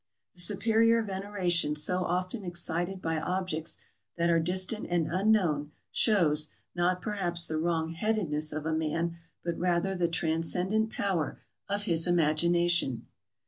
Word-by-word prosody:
The 175 - +1
superior 225 +4 +3
veneration 190 -6 +1
so 180 +5 +1
often 185 +5 -2
excited 175 +1 -2
by 160 -1 -1
objects 180 -2 -3 0.4
that 170 0 +1
are 165 - +3
distant 185 +6 +1
and 175 -2 +1
unknown, 170 -5 +1 0.2
shows, 155 -8 +3 0.2
not 180 +1 0
perhaps 175 -5 -1
the 155 -1 -3
wrong 165 -1 -1
headedness 165 -5 -1
of 155 0 -5
a 160 - -1
man, 165 +2 -2 0.2
but 170 -1 -3
rather 180 +2 0
the 180 -2 0
transcendent 175 +6 0
power 190 -8 -2 0.3
of 205 +1 -1
his 165 -4 +2
imagination. 170 -3 +2
175 Hz, 135 wpm, -29 LUFS, 160-190 Hz, 0.4 s, superior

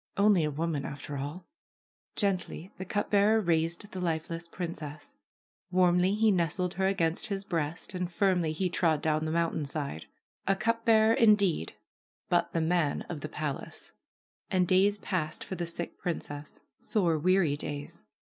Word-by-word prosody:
Only 200 -4 +5
a 150 - +1
woman, 155 -1 -2
after 145 +1 -6
all! 145 +6 -5 0.7
Gently 190 -2 -1
the 190 - -4
cup 205 +3 -2
bearer 210 +2 +5
raised 170 +1 0
the 185 - -5
lifeless 165 -1 -2
princess. 155 -4 -6 0.5
Warmly 180 +1 +3
he 220 0 +4
nestled 180 0 0
her 190 0 +1
against 170 -4 0
his 195 -1 -3
breast 165 -3 -3
and 180 -1 -3
firmly 180 -3 +2
he 185 +4 0
trod 165 -4 +1
down 155 0 +1
the 155 - -1
mountainside. 150 - -1 0.4
A 195 - +4
cup 230 +3 0
bearer, 220 0 +5
indeed, 205 - +3 0.5
but - - +2
the 165 - 0
man 160 -3 +1
of 160 -4 -5
the 155 - -5
palace 150 -3 -5 0.6
I - - 0
And 180 -1 +3
days 195 +3 +4
passed 165 -6 -2
for - - -6
the 175 -2 -3
sick 170 +1 -4
princess, 150 -4 -5 0.2
sore, 170 -7 +1
weary 180 -3 +3
days. 145 0 -6
175 Hz, 160 wpm, -29 LUFS, 155-195 Hz, 0.7 s, Only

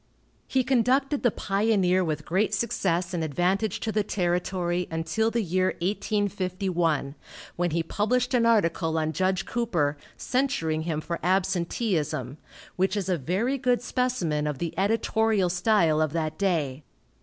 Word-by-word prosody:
He 260 -1 +1
conducted 265 +3 +2
the 240 - +4
Pioneer 195 -3 +1
with 150 -3 -3
great 200 +4 +1
success 185 -5 -1
and 170 -2 -1
advantage 180 +7 0
to 220 - -1
the 215 0 +1
territory 180 -2 -1
until 165 +8 0
the 230 0 0
year 185 +1 0
1851, 185 -6 -1 0.4
when 175 0 0
he 165 +1 0
published 245 +9 0
an 235 -2 +3
article 165 -7 +2
on 155 0 0
Judge 185 +3 0
Cooper, 170 -12 0 0.2
censuring 250 - 0
him 155 -1 -1
for 170 +1 -4
absenteeism, 175 - -1 0.4
which 190 +3 +1
is 195 -2 -2
a 180 - +2
very 205 - -1
good 245 -2 +1
specimen 205 - -1
of 150 -2 -2
the 170 +1 -3
editorial 220 -1 +1
style 175 -4 +2
of 155 -1 0
that 155 -2 -2
day. 155 -8 -1
185 Hz, 145 wpm, -26 LUFS, 165-220 Hz, 0.4 s, the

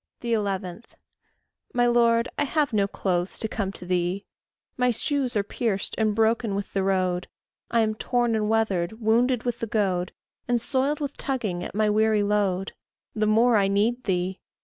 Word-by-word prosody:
11. 200 -4 -2 0.9
My 245 0 +4
Lord, 235 -1 +3
I - - +1
have 290 -3 0
no 200 -2 +2
clothes 180 -2 -2
to 220 - 0
come 200 -3 -3
to 180 - -9
thee; 180 +2 -1 0.5
My 250 -1 +2
shoes 255 +1 -1
are 205 - +2
pierced 205 -1 -2
and 215 -2 +1
broken 225 -1 +1
with 200 0 -4
the 195 - +1
road; 185 -2 0 0.4
I 235 - +3
am 215 -1 +1
torn 240 +1 0
and 215 -1 0
weathered, 210 -5 +1
wounded 235 +2 +2
with 245 -2 -2
the 230 - -3
goad, 190 -4 0 0.4
And 245 -1 +2
soiled 275 +5 0
with 285 -1 -4
tugging 215 -10 -2
at - - -7
my 215 0 +2
weary 215 0 +3
load: 200 -2 0 0.4
The 215 -1 0
more 225 +2 +4
I 195 -1 +3
need 220 +5 +1
thee! 185 0 -1
215 Hz, 170 wpm, -25 LUFS, 195-240 Hz, 0.9 s, My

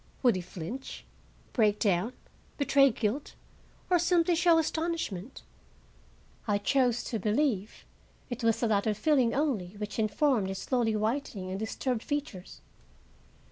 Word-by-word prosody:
Would 245 -5 +5
he 185 - -2
flinch, 180 +9 -7 0.5
break 210 -3 +3
down, 205 +3 +1 0.4
betray 275 -1 +5
guilt, 230 +4 -2 0.5
or 360 -1 +3
simply 345 0 +3
show 335 0 +4
astonishment? 315 - -2 1.0
I 205 -1 +2
chose 245 +2 +1
to 225 - -3
believe 215 -1 -1 0.4
it 245 -1 -6
was 230 0 +2
the 235 - +2
latter 210 0 +1
feeling 255 +1 +2
only 230 - -1
which 210 +1 -5
informed 220 0 +2
his 190 0 -4
slowly 230 0 0
whitening 215 -4 -2
and 190 - -3
disturbed 220 +2 -2
features. 285 -11 -5
230 Hz, 130 wpm, -29 LUFS, 205-280 Hz, 1.0 s, Would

